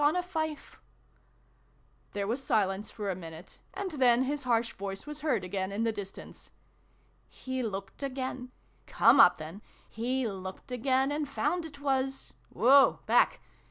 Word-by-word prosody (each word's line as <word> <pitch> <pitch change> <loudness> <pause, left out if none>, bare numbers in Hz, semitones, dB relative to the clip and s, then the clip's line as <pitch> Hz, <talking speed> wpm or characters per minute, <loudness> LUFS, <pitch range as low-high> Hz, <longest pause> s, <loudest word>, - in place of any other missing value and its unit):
335 315 -1 -1 1.3
There 200 -1 -2
was 240 +6 -2
silence 195 -2 0
for 205 -3 -4
a - - -3
minute: 165 -1 -10 0.2
and 395 -2 -3
then 255 -4 +4
his 285 +2 -2
harsh 235 -1 +1
voice 195 0 -6
was 300 0 -6
heard 260 -10 0
again 190 +1 -3
in 210 +3 -1
the 230 - +2
distance. 200 -2 -9 0.4
" - - -37 0.2
He 260 0 -5
looked 200 -2 -5
again 260 -2 -4 0.4
come - - +5
up, 180 - +8
then! 160 +6 -8 0.3
He 250 +2 -1
looked 190 +4 -7
again, 260 +2 +1
and 295 -1 -2
found 325 +5 -1
it 300 -3 -10
was 270 -1 -1 0.2
woa 270 +3 +5
back - - +3
250 Hz, 150 wpm, -30 LUFS, 200-280 Hz, 1.3 s, up